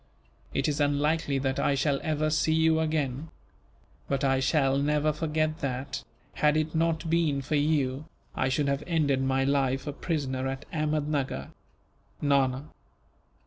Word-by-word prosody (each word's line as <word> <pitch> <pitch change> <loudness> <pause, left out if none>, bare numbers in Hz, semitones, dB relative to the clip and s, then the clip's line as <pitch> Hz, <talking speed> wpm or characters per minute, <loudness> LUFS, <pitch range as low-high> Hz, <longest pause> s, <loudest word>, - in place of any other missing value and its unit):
It 135 - 0
is 150 0 -1
unlikely 145 0 +1
that 135 0 -1
I 145 - +2
shall 140 0 +1
ever 155 -1 0
see 155 +1 +2
you 160 0 +3
again; 155 -2 -1 0.8
but 140 0 -1
I 135 -1 +3
shall 135 0 +2
never 150 +1 +1
forget 155 +1 -1
that, 135 0 -3 0.3
had 150 0 +2
it 155 0 -1
not 165 0 0
been 160 -4 +1
for 145 - -4
you, 145 -2 +1 0.3
I 130 - 0
should 140 +2 +1
have 140 0 0
ended 145 -6 +1
my 135 0 +1
life 135 -1 +1
a 145 - -3
prisoner 135 -5 -2
at 135 0 -5
Ahmednuggur. 150 - -1 0.7
"Nana." 140 -1 +1
145 Hz, 145 wpm, -28 LUFS, 135-155 Hz, 0.8 s, you